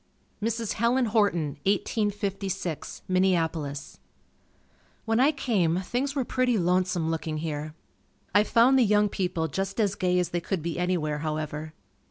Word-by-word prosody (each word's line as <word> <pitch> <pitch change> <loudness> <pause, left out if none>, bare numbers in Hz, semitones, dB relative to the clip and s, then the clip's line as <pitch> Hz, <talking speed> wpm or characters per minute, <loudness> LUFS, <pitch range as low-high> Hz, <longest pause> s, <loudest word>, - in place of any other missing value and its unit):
Mrs. 225 0 -1
Helen 240 +3 +2
Horton 200 - +1
1856, 195 -4 -2
Minneapolis. 165 -6 0 1.1
When 225 0 +1
I 275 +4 +5
came, 190 - +1
things 260 +8 -2
were 265 -3 0
pretty 250 -2 +1
lonesome 180 -2 +1
looking 160 -1 -3
here. 155 -1 -4 0.6
I 205 +1 +6
found 240 +5 +4
the - - +6
young 210 -1 +3
people 175 -4 -1
just 195 - -3
as 205 -3 +2
gay 180 -2 +1
as 180 -2 +1
they 175 -1 -2
could 180 -2 -3
be 170 0 -3
anywhere, 165 -5 0
however. 155 0 -4
185 Hz, 140 wpm, -27 LUFS, 160-215 Hz, 1.1 s, I